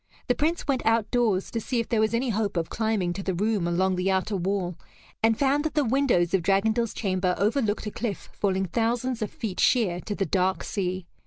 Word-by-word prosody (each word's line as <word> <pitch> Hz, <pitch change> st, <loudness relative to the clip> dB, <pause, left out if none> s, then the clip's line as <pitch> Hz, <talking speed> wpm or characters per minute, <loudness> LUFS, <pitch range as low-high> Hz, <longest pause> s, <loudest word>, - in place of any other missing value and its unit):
The 250 Hz, -, +4 dB
Prince 315 Hz, +6 st, -1 dB
went 275 Hz, -3 st, 0 dB
outdoors, 225 Hz, -3 st, +1 dB
to 230 Hz, -, -2 dB
see 245 Hz, +2 st, -1 dB
if 230 Hz, -, -2 dB
there 230 Hz, -, +1 dB
was 220 Hz, +1 st, +2 dB
any 250 Hz, +2 st, 0 dB
hope 205 Hz, -3 st, -1 dB
of 165 Hz, -1 st, -2 dB
climbing 215 Hz, -5 st, 0 dB
to 195 Hz, -, -5 dB
the 190 Hz, -1 st, -2 dB
room 205 Hz, -1 st, 0 dB
along 185 Hz, +2 st, +1 dB
the 180 Hz, +1 st, 0 dB
outer 190 Hz, +2 st, 0 dB
wall, 185 Hz, -1 st, -1 dB, 0.5 s
and 225 Hz, 0 st, +3 dB
found 280 Hz, +1 st, +2 dB
that 315 Hz, -1 st, -3 dB
the 295 Hz, -3 st, +3 dB
windows 235 Hz, -9 st, +2 dB
of 190 Hz, -, +3 dB
Dragondel's 215 Hz, +5 st, +1 dB
chamber 185 Hz, -3 st, 0 dB
overlooked 215 Hz, -, 0 dB
a 210 Hz, -, -3 dB
cliff 220 Hz, -2 st, -4 dB
falling 190 Hz, -1 st, 0 dB
thousands 235 Hz, +5 st, -1 dB
of 215 Hz, -, -1 dB
feet 205 Hz, -5 st, -5 dB
sheer 200 Hz, -9 st, +3 dB
to 205 Hz, -, -4 dB
the 195 Hz, -, 0 dB
dark 185 Hz, -2 st, 0 dB
sea. 185 Hz, -2 st, -3 dB
210 Hz, 215 wpm, -26 LUFS, 185-230 Hz, 0.5 s, The